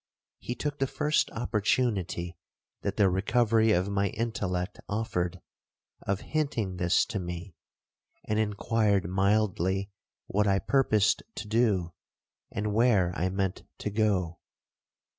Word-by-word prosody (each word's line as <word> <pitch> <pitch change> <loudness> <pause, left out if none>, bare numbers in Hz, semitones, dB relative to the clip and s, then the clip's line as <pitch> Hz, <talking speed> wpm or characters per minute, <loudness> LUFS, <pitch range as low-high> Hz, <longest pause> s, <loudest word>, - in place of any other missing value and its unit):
He 120 - -4
took 145 +1 -3
the 135 - +1
first 150 +3 +1
opportunity 105 -6 0 0.5
that - - -3
the 100 - +5
recovery 110 +4 +3
of 90 -1 +2
my 100 0 +1
intellect 100 -4 -2
offered, 90 -4 -2 0.6
of 100 0 -2
hinting 115 - -1
this 90 0 +3
to 110 -5 -3
me, 90 +1 -6 0.7
and 105 0 0
inquired 105 -2 +1
mildly 95 0 +1 0.3
what 105 +1 +1
I 100 -1 +4
purposed 110 -4 +2
to 105 - -6
do, 105 -6 +1 0.6
and 105 0 -2
where 105 -6 +3
I 90 +2 0
meant 95 0 -2 0.2
to 105 - -4
go. 100 -6 0
100 Hz, 125 wpm, -28 LUFS, 95-110 Hz, 0.7 s, the